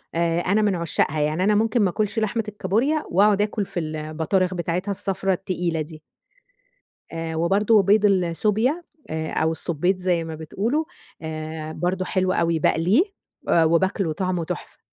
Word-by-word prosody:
آآ، 170 0 +1
أنا 200 +5 +2
من 205 -3 +2
عشاقها، 160 -2 0
يعني 155 +5 0
أنا 210 +1 +3
ممكن 225 +2 +2
ما 195 - +3
آكلش 210 +4 -1
لحمة 220 +1 0
الكابوريا، 220 +10 0
وأقعد 205 +3 +4
آكل 210 0 -1
في 180 - -4
البطارخ 160 +4 -1
بتاعتها 180 +3 -2
الصفرا 195 0 -1
التقيلة 180 -3 -2
دي. 155 0 -8 1.1
آآ، 165 0 -4
وبرضه 200 +6 +3
بيض 210 +2 +4
السوبيا، 210 - +1 0.3
آآ 160 0 -3
أو 160 0 +1
السبيط- 170 +3 0
زي 180 -2 +1
ما 160 -1 -6
بتقولوا- 215 - -2 0.4
آآ، 155 0 -5
برضه 180 +3 -1
حلو 185 0 0
أوي. 170 -2 +1
باقليه 180 - +3 0.5
آآ، 165 - +5
وباكله، 170 +1 +1
طعمه 180 0 -1
تحفة. - - -7
185 Hz, 155 wpm, -23 LUFS, 165-205 Hz, 1.1 s, آآ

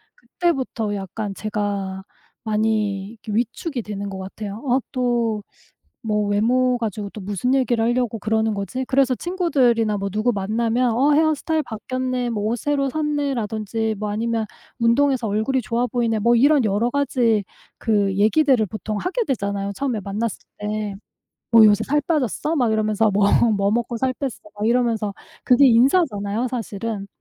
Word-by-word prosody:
그때부터 270 - -2
약간 200 +1 -5
제가 200 -2 -3 0.4
많이 215 -3 0
이렇게 220 -1 -8
위축이 245 +5 -2
되는 200 -2 -5
것 190 -1 -6
같아요. 200 +2 -7
어 255 0 +3
'또 235 -4 0 0.6
뭐 210 -2 0
외모 245 +5 +2
가지고 210 -3 -4
또 215 - -9
무슨 205 +5 -1
얘기를 245 -4 +2
하려고 240 -1 0
그러는 220 +1 0
거지?' 200 +6 -3
그래서 265 -1 +2
친구들이나 255 - +1
뭐 200 0 -2
누구 215 +5 0
만나면 230 +4 0
"어 275 +5 +3
헤어스타일 315 +1 +2
바뀌었네." 255 +2 -3
뭐 210 -3 -2
"옷 225 +3 0
새로 280 +2 0
샀네?"라든지 230 -7 -2
뭐 210 -1 -2
아니면 225 +1 -1 0.3
"운동해서 240 0 +2
얼굴이 220 +6 0
좋아 235 +2 0
보이네." 230 -2 0
뭐 235 +3 +4
이런 280 +2 +4
여러 215 +3 +1
가지 245 -6 +1 0.3
그 205 -4 +1
얘기들을 240 +3 +3
보통 215 +2 -5
하게 375 - -1
되잖아요, 200 -5 -2
처음에 250 -1 -2
만났을 205 +3 -3 0.2
때. 210 -1 -3 0.6
뭐 230 -1 +8
"요새 210 +1 +4
살 295 +2 +1
빠졌어? 300 - -1
"막 245 -6 +2
이러면서 215 0 +2
뭐 200 +1 +3 0.3
"뭐 200 0 +1
먹고 235 +1 -1
살 260 +2 0
뺐어?" 275 +1 -3 0.3
막 210 - 0
이러면서 230 -3 +1 0.3
그게 255 +2 +6
인사잖아요, 240 - +2
사실은. 225 -3 -4
225 Hz, 340 characters per minute, -22 LUFS, 210-255 Hz, 0.6 s, 뭐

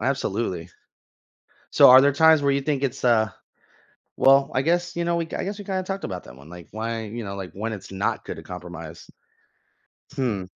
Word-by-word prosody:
Absolutely. 105 -8 -2 1.0
So - - +7
are 130 +1 +10
there 140 0 +4
times 160 +1 +5
where 140 -1 +2
you 140 - +1
think 140 -1 -1
it's, 130 -2 -3
uh 110 -3 +3 0.9
well, 135 +1 +5
I 130 - +2
guess, 175 +3 0
you 170 - -1
know, 170 0 0
we 170 - -1
I - - -4
guess 200 +2 -5
we 205 - -8
kinda 190 -1 -2
talked 195 +1 -5
about 90 -3 -5
that 60 - -13
one, 70 +3 -15
like, 90 -1 -11
why, 115 +1 -4
you 115 +2 -6
know, 100 0 -6
like, 95 -2 -7
when 110 +3 -4
it's 100 -2 -9
not 95 +1 -2
good - - -6
to - - -10
compromise? - - -9 1.1
Hmm. 115 -9 -2
130 Hz, 205 wpm, -24 LUFS, 105-160 Hz, 1.1 s, are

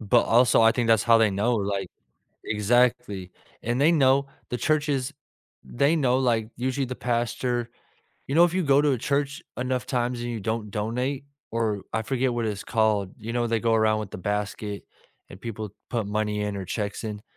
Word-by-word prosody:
but 115 +2 +4
also 120 0 +4
I 115 - +7
think 120 0 0
that's 110 -3 +4
how 115 -1 +5
they 110 -2 +4
know, 105 +5 +1
like 100 -2 -2 0.6
exactly, 105 -3 +1 0.3
and 120 +2 -1
they 160 - +5
know 140 -3 +4 0.2
the 125 - -2
churches, 145 -2 0 0.5
they 140 +6 +1
know, 130 -5 +2
like 115 -4 +1
usually 130 +2 -1
the 130 0 -5
pastor 120 0 -1 0.6
you 140 - -3
know, 170 +2 +7
if 175 - +1
you 185 +1 +1
go 140 -2 +4
to 145 -2 +3
a 125 - 0
church 145 +5 -1
enough 125 0 -2
times 120 -1 -1
and 120 - -4
you 115 - -3
don't 110 +1 -3
donate, 125 +7 -2 0.3
or 110 -3 -1
I 115 - +1
forget 130 0 0
what 120 -1 -1
it's 105 -2 -3
called, 110 -4 +1
you 110 +2 -6
know, 120 0 0
they 115 -1 +1
go 115 0 +1
around 110 -1 +3
with 105 -3 -6
the - - -7
basket 105 +1 -3 0.5
and 95 - -11
people 110 -2 -5 0.2
put 115 -4 -2
money 105 0 -1
in 105 -1 -2
or 95 -2 -5
checks 105 +3 -3
in. 105 -1 -5
115 Hz, 195 wpm, -25 LUFS, 105-130 Hz, 0.6 s, I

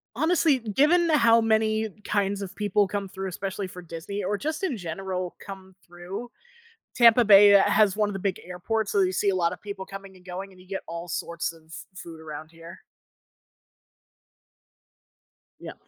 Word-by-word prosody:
Honestly, 315 -1 +2
given 300 - +2
how 235 -6 +5
many 220 0 +1
kinds 200 -1 -1
of 195 -2 -7
people 205 -1 +1
come 200 0 -3
through, 190 +1 -6
especially 190 +2 -4
for 180 -1 -10
Disney 175 +4 -6
or 205 +2 -1
just 315 - -4
in 345 -9 0
general 185 0 -5
come 190 -1 -11
through, 180 +7 -8 0.6
Tampa 235 0 +6
Bay 205 0 +8
has 200 0 +5
one 210 -1 +1
of - - -5
the 195 - -4
big 190 -1 -2
airports. 200 +5 -3
So 200 - +2
you 185 -1 +2
see 200 +2 +1
a 190 - +1
lot 170 -1 +1
of 180 - -11
people 200 -2 -7
coming 195 -1 -10
and 180 -1 -19
going 190 +2 -7
and 185 - -18
you 185 - -19
get 195 0 -4
all 170 +1 -6
sorts 170 0 -3
of 165 -1 -18 0.3
food 165 -3 -10
around 155 0 -9
here. 165 +1 -13 2.8
Yeah. - - -8
195 Hz, 175 wpm, -26 LUFS, 180-215 Hz, 2.8 s, Bay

